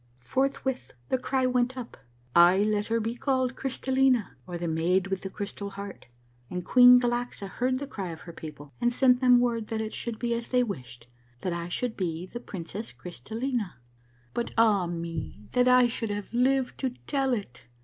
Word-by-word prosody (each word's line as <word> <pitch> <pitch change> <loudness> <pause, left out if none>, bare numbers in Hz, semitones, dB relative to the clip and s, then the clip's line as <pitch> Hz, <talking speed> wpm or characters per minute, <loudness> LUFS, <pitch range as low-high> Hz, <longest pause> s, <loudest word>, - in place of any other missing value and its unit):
" - - -35
Forthwith 265 -1 0 0.2
the 260 - +1
cry 260 0 0
went 250 0 +1
up: 245 -2 -7 0.2
' 120 +1 -34
Ay, 175 +3 +7
let 210 -1 0
her 230 0 +1
be 225 +1 -2
called 260 0 0
Crystal 265 0 -3
lina, 260 -5 +3
or 175 -1 -4
the 170 0 -3
Maid 170 +4 +2
with 195 -1 -3
the 190 - -5
Crystal 200 0 -5
Heart,' 200 0 -8 0.4
and 180 -1 -4
Queen 250 0 +8
Galaxa 240 -4 -2
heard 255 +6 0
the 285 - -4
cry 200 -9 -5
of 165 -1 -8
her 170 - -10
people 150 -3 -10
and 240 - +3
sent 250 0 +4
them 250 -1 +6
word 235 -3 0
that 225 -1 -3
it 220 0 -3
should 235 -2 -3
be 235 0 -1
as 235 0 -3
they 250 -1 +3
wished 125 - -6 0.2
— 125 0 -33
that 180 - -1
I 170 0 -3
should 240 +5 -2
be 170 -2 -2
the 240 +6 -7
Princess 205 0 -6
Crystallina. 220 - -4 0.3
" 120 -1 -34
But. 235 - -3
ah 210 -5 +4
me, 165 -10 -5
that 250 0 +3
I 250 0 +7
should 230 -2 -2
have 205 +1 -5
lived 260 +2 +2
to 260 -2 -2
tell 270 -3 +1
it 160 - -7
225 Hz, 205 wpm, -28 LUFS, 180-250 Hz, 0.4 s, Queen